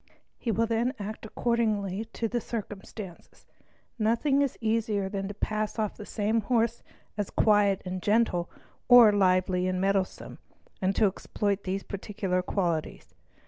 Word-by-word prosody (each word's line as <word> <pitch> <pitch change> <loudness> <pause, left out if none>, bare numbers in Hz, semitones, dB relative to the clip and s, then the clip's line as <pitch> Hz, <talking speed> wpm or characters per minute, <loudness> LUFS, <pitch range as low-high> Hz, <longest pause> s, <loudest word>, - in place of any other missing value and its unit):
He 240 - -3
will 225 +1 +2
then 235 +4 0
act 215 +1 -6
according 215 -4 0
to 230 +1 -1
circumstances. 205 -4 -8 0.5
Nothing 235 +6 +2
is 280 -3 0
easier 220 -3 0
than 195 -1 -3
to 205 - -7
pass 215 +1 -2
off 215 -2 -1
the 210 - -10
same 220 +1 0
horse 230 +1 +1 0.4
as 205 -2 -2
quiet 205 -3 +3
and 185 0 -4
gentle 205 -5 +1 0.4
or 245 -3 +9
lively 185 -2 +2
and 185 0 -1
mettlesome, 195 0 -1 0.4
and 190 +1 +1
to 220 - +4
exploit 200 +1 -1
these 190 +1 -2
particular 195 -2 -2
qualities. 175 -4 -2
205 Hz, 140 wpm, -28 LUFS, 195-225 Hz, 0.5 s, or